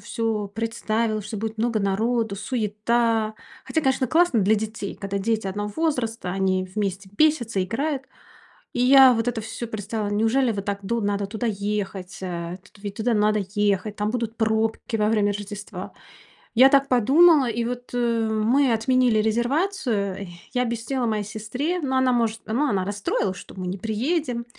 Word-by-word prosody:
всё 220 -3 -2
представила, 220 0 -1
что 215 +2 -6
будет 220 +1 -4
много 230 -1 +1
народу, 220 +2 0
суета. 220 0 0 0.3
Хотя, 320 - -1
конечно, 265 0 +2
классно 320 -6 +3
для 205 +3 +4
детей, 215 -1 -4
когда 200 0 -3
дети 220 0 -1
одного 205 +2 -3
возраста, 240 - -1
они 190 0 0
вместе 195 -2 -3
бесятся, 240 -9 +2
играют. 270 +7 -2 0.7
И - - -4
я 265 0 +8
вот 225 +1 -1
это 225 -2 -1
всё 225 +2 -6
представила. 215 0 -4
Неужели 225 +4 +2
вот 200 -1 -4
так 200 -1 -2
ду 230 +3 -1
надо 205 0 0
туда 225 +3 -3
ехать, 200 -3 -3
э, 175 -1 -4 0.2
ведь 200 -1 -6
туда 235 +2 0
надо 210 0 +2
ехать, 205 0 +1
там 210 +1 -1
будут 230 -2 -3
пробки 220 +1 0
во 210 0 +2
время 205 -2 +2
Рождества. 205 0 -7 0.6
Я 260 +3 +8
так 275 0 +4
подумала, 275 +5 +5
и 230 +1 -1
вот, 245 +1 -5
э, 235 -2 +1
мы 235 +4 +2
отменили 240 0 +3
резервацию, 235 - 0 0.3
я 250 - +1
объяснила 235 +2 -2
моей 215 -2 0
сестре 245 - -3
ну, 265 -2 -1
она 260 -1 +3
может 230 -2 0
ну, 250 +7 +1
она 195 -6 0
расстроилась, 200 -2 -1
что - - -12
мы 185 -1 -4
не 190 +2 -3
приедем, 235 - -1
220 Hz, 165 wpm, -24 LUFS, 205-245 Hz, 0.7 s, я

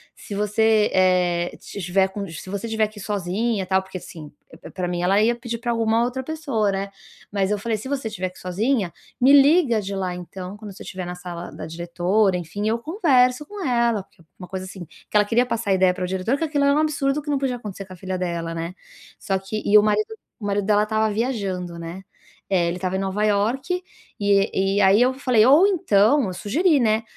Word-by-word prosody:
se - - -9
você, 210 +1 +2
eh, 180 -2 +2
se - - -9
tiver 190 +2 +2
com 200 +1 -6
se 165 +2 -9
você 200 +3 -4
tiver 220 -1 +1
que 215 0 -17
ir - - -8
sozinha, 205 +2 -1
tal", 190 0 +2
porque 190 -1 -8
assim, 155 -3 -11 0.3
p - - -11
pra 185 -1 -3
mim 175 0 -2
ela 195 +3 +3
ia 235 +2 +3
pedir 235 -1 -5
pra 240 0 -4
alguma 230 0 +2
outra 250 +2 -2
pessoa, 275 -9 -1
né, 195 +1 -3 0.4
mas 195 -1 0
eu 210 - 0
falei: 225 +1 -1
"Se 215 - -8
você 265 -5 -2
tiver 185 -3 -4
que - - -19
ir - - -14
sozinha, 200 +2 0 0.3
me 265 +3 +6
liga 280 -5 +4
de 200 -1 -5
lá 185 -2 -2
então, 180 +2 -8
quando 210 -1 -9
você - - -11
tiver 185 -1 -6
na 180 - -5
sala 175 -1 -7
da - - -8
diretora, 175 +4 +1
enfim, 180 +5 -4
eu 225 +2 +1
converso 275 - +2
com 410 +3 -7
ela". 235 - +1
Porque 180 -3 -22 0.2
uma 180 - -8
coisa 185 0 -5
assim, 185 -1 -8
que 170 - -16
ela 210 0 +5
queria 235 +4 +2
passar 230 -3 -3
a - - +4
ideia 185 -1 +3
pra 180 -1 -3
diretora 190 +8 -1
que - - -1
aquilo 295 -3 0
era 280 - +4
um 295 - +2
absurdo, 300 -2 0
que 295 - -8
não 285 - +1
podia 265 -2 -1
acontecer 205 -4 -8
com 185 - -12
a - - -10
filha 185 +1 -4
dela, 170 -2 -3
né, 165 +2 -4 0.5
só 195 -2 -1
que, 195 +3 -5
e 210 - +6
o 210 - +6
marido 430 - 0 0.2
o 210 - -8
marido 200 0 0
dela 210 0 +3
tava 220 0 +1
viajando, 195 -7 -2
né, 170 +3 -7 0.5
eh, 180 -3 +2
ele 170 +1 -2
tava 185 +1 -2
em - - -2
Nova 195 +2 -1
York 245 - 0 0.4
e 195 -1 +2
e - - +4
aí 195 +3 +5
eu 255 +1 +4
falei: 250 -5 +3
"Ou 290 +9 +7
então", 280 - +3
eu 185 - -4
sugeri, 300 - +2
né: 220 -2 +2
205 Hz, 230 wpm, -23 LUFS, 185-240 Hz, 0.5 s, Ou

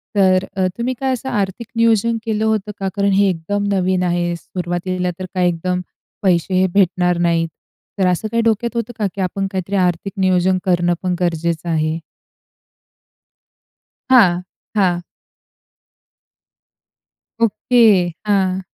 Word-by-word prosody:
तर 190 -1 +4
अ, 190 -1 +1
तुम्ही 240 +2 -1
काय 265 -1 0
असं 255 +1 -4
आर्थिक 205 +2 -2
नियोजन 230 0 +3
केलं 220 -1 0
होतं 215 -2 0
का? 195 - -2
कारण 200 -1 +2
हे 195 +1 +4
एकदम 195 +4 -2
नवीन 185 -1 +1
आहे. 175 -1 0
सुरुवातीला 180 +1 -3
तर 185 - -4
काय 180 -1 +2
एकदम 180 +1 -1 0.4
पैसे 185 -1 +2
हे 185 +1 +3
भेटणार 180 -2 +2
नाहीत. 170 -1 +1 0.5
तर 190 - +3
असं 180 +4 0
काही 230 - +2
डोक्यात 230 +1 0
होतं 235 +1 -3
का, 210 - +1
की 200 - -3
आपण 195 +1 -1
काहीतरी 190 0 -3
आर्थिक 180 +1 0
नियोजन 185 0 +3
करणं 175 -1 +2
पण 180 -1 0
गरजेचं 170 -1 -1
आहे? 160 0 0 2.1
हां. 185 -9 +5 0.3
हां. 180 -4 +2 2.4
ओके. 220 -4 +4 0.2
हां. 190 -2 +1
185 Hz, 135 wpm, -19 LUFS, 175-205 Hz, 2.4 s, हां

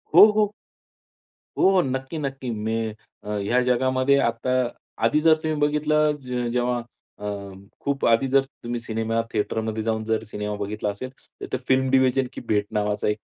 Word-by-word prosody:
हो, - - +11
हो. 210 -1 +2 1.1
हो, 190 -1 +5
नक्की, 130 +3 -3
नक्की. 135 -3 -4
मी 110 +1 -2 0.3
अ, 105 - -8
ह्या 120 +5 +1
जगामध्ये 130 +2 +2
आत्ता 115 +2 -2 0.6
आधी 150 +7 +3
जर 160 0 +6
तुम्ही 155 -1 -1
बघितलं, 150 0 +2
ज 125 -2 -2
जेव्हा 125 0 +1 0.4
अ, - - -11 0.6
खूप 140 -1 -1
आधी 115 +3 +4
जर 135 +1 +4
तुम्ही 120 -3 -6
सिनेमा 115 0 -1
थिएटरमध्ये 110 +1 -1
जाऊन 110 0 -1
जर 110 0 0
सिनेमा 105 0 -3
बघितला 105 +1 -3
असेल, 100 +6 -5 0.3
तर - - -3
ते - - 0
फिल्म 130 0 +3
डिव्हिजन 130 0 +3
की - - -7
भेट 105 -1 +2
नावाचा 105 0 0
एक 105 0 +1
125 Hz, 160 wpm, -24 LUFS, 110-135 Hz, 1.1 s, हो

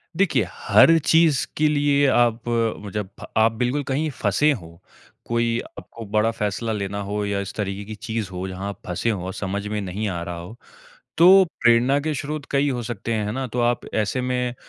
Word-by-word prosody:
देखिए, 195 0 +2
हर 165 0 +5
चीज़ 160 -4 +4
के 155 - +3
लिए 145 -1 +3
आप 120 -3 +3
वो 115 -3 -1
जब 105 -1 -4 0.3
आप 110 +1 +5
बिल्कुल 125 +5 -1
कहीं 140 +4 -1
फँसे 150 +2 +1
हो, 85 - -7 0.4
कोई 115 0 0 0.2
आपको 115 - -11
बड़ा 105 +2 +1
फैसला 105 +1 -2
लेना 100 -1 -3
हो 105 +1 -3
या 100 -1 -1
इस 100 - -6
तरीके 100 -1 -3
की 110 +1 -7
चीज़ 110 -1 -4
हो 90 +1 -4
जहाँ 95 +1 -5
आप 100 - -8
फँसे 90 +6 -1
हो 95 -4 -2
समझ 100 +1 -4
में 105 0 -2
नहीं 100 +3 -3
आ 85 -3 -4
रहा 85 0 -5
हो, 90 +6 -9 0.6
तो 190 +3 +8 0.2
प्रेरणा 120 +4 +4
के 155 +1 -2
स्रोत 145 +2 -4
कई 140 +1 +2
हो 125 -2 -2
सकते 115 0 -4
हैं 110 -2 0
है 105 - -2
ना? 130 +2 -3
तो 125 0 -3
आप 120 0 +2
ऐसे 110 +4 0
में 125 -1 -1
115 Hz, 200 wpm, -23 LUFS, 100-135 Hz, 0.6 s, तो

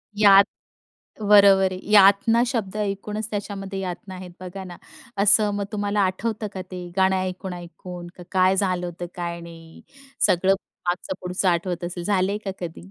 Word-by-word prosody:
यात 200 -1 +7 0.8
बरोबर 200 -2 +6
आहे. 185 - -6
यातना 205 +3 +6
शब्द 220 -6 -3
ऐकूनच 210 +1 -3
त्याच्यामध्ये 200 -1 -5
यातना 185 +1 -6
आहेत 185 -1 -9
बघा 185 +1 -7
ना, 180 -2 -9 0.5
असं 210 +1 +5
मग 200 0 -2
तुम्हाला 205 0 -1
आठवतं 210 +3 -1
का 185 - -4
ते 180 -1 -6
गाणं 190 0 +3
ऐकून-ऐकून 180 -1 -6
का 180 - -10
काय 185 0 +3
झालं 185 -2 0
होतं, 175 0 -6
काय 170 -1 -4
नाही. 165 -1 -13 0.4
सगळं 185 +2 +3 0.4
मागचं-पुढचं 180 +1 -2
आठवत 175 0 -1
असेल, 175 0 -5
झालंय 200 +1 +1
का 195 - -2
कधी? 160 - -8
190 Hz, 150 wpm, -23 LUFS, 180-200 Hz, 0.8 s, यात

